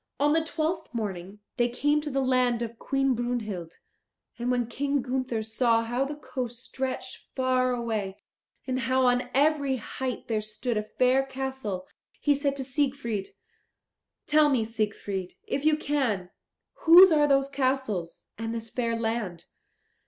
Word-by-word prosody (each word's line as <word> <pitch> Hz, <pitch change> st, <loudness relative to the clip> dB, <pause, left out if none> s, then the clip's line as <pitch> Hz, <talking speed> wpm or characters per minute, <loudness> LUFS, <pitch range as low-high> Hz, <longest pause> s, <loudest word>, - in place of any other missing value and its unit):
On 295 Hz, +1 st, +4 dB
the 325 Hz, 0 st, +3 dB
twelfth 320 Hz, +1 st, -2 dB
morning 200 Hz, -2 st, -4 dB, 0.2 s
they 240 Hz, -1 st, +3 dB
came 295 Hz, +5 st, +1 dB
to 300 Hz, -, -4 dB
the 270 Hz, -1 st, 0 dB
land 250 Hz, -2 st, +2 dB
of 230 Hz, 0 st, -7 dB
Queen 270 Hz, -1 st, +1 dB
Brunhild. 220 Hz, -8 st, -3 dB, 0.6 s
And 240 Hz, +1 st, -1 dB
when 245 Hz, -1 st, +1 dB
King 280 Hz, +3 st, -1 dB
Gunther 255 Hz, -3 st, -2 dB
saw 230 Hz, +1 st, +2 dB
how 240 Hz, +4 st, 0 dB
the 290 Hz, +2 st, -5 dB
coast 250 Hz, -5 st, -5 dB
stretched 265 Hz, 0 st, -5 dB
far 255 Hz, -1 st, +2 dB
away, 220 Hz, -5 st, -2 dB, 0.5 s
and 255 Hz, -1 st, -1 dB
how 260 Hz, +1 st, +2 dB
on 250 Hz, 0 st, +2 dB
every 285 Hz, -1 st, +3 dB
height 255 Hz, +2 st, -5 dB
there 220 Hz, -2 st, 0 dB
stood 215 Hz, +3 st, -3 dB
a 210 Hz, -, +1 dB
fair 255 Hz, +5 st, +2 dB
castle, 265 Hz, -8 st, -4 dB, 0.3 s
he 290 Hz, -, +3 dB
said 280 Hz, 0 st, 0 dB
to 270 Hz, -, -4 dB
Siegfried, 255 Hz, -6 st, -1 dB, 1.0 s
"Tell 300 Hz, 0 st, +5 dB
me, 255 Hz, -5 st, +2 dB
Siegfried, 210 Hz, -4 st, -3 dB
if 280 Hz, -, -2 dB
you 310 Hz, -1 st, +4 dB
can, 250 Hz, -12 st, -1 dB, 0.5 s
whose 350 Hz, +3 st, +10 dB
are 295 Hz, -2 st, +4 dB
those 275 Hz, -1 st, +3 dB
castles, 260 Hz, -11 st, -2 dB
and 225 Hz, 0 st, -3 dB
this 225 Hz, -1 st, -5 dB
fair 230 Hz, -2 st, -1 dB
land. 225 Hz, -6 st, -2 dB
250 Hz, 150 wpm, -27 LUFS, 225-275 Hz, 1.0 s, whose